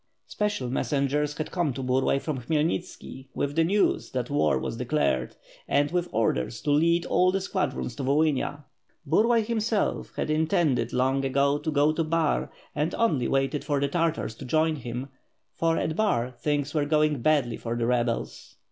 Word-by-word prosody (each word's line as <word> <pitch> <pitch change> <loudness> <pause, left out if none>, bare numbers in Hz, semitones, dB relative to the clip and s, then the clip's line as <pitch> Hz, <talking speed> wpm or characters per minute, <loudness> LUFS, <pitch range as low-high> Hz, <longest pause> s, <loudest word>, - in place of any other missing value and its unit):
Special 205 -11 -2
messengers 145 +3 0
had 155 - -4
come 170 -7 0
to 135 - -5
Burlay 130 +2 +2
from 140 -1 -3
Khmyelnitski 150 -1 -2
with 140 0 -2
the 165 - +4
news 200 +5 +1
that 125 0 -2
war 75 - +2
was 65 - -3
declared, 125 - 0 0.3
and 145 +2 +2
with 175 0 -1
orders 110 - 0
to 145 - 0
lead 170 +3 +3
all 185 0 +3
the 195 - 0
squadrons 140 -9 -2
to 140 - -3
Volhynia. 145 +1 +1 0.4
Burlay, 225 +9 +3
himself, 220 -2 -1
had - - -2
intended 155 - +1
long 130 +2 +1
ago 140 +2 +2
to 160 - -3
go 150 0 +3
to 165 +1 -1
Bar, 160 -1 0 0.2
and 150 +3 -1
only 150 - +1
waited 135 +2 0
for 145 -2 0
the 140 - +1
Tartars 165 -4 -1
to - - -9
join 155 +4 +1
him, 125 +1 -5 0.4
for 165 0 +1
at 160 - -1
Bax 125 - 0
things 145 -1 -1
were 150 -2 +1
going 150 -2 +2
badly 140 -5 +2
for 115 0 -4
the 120 -1 -1
rebels. 120 -1 -2
145 Hz, 175 wpm, -26 LUFS, 130-160 Hz, 0.4 s, the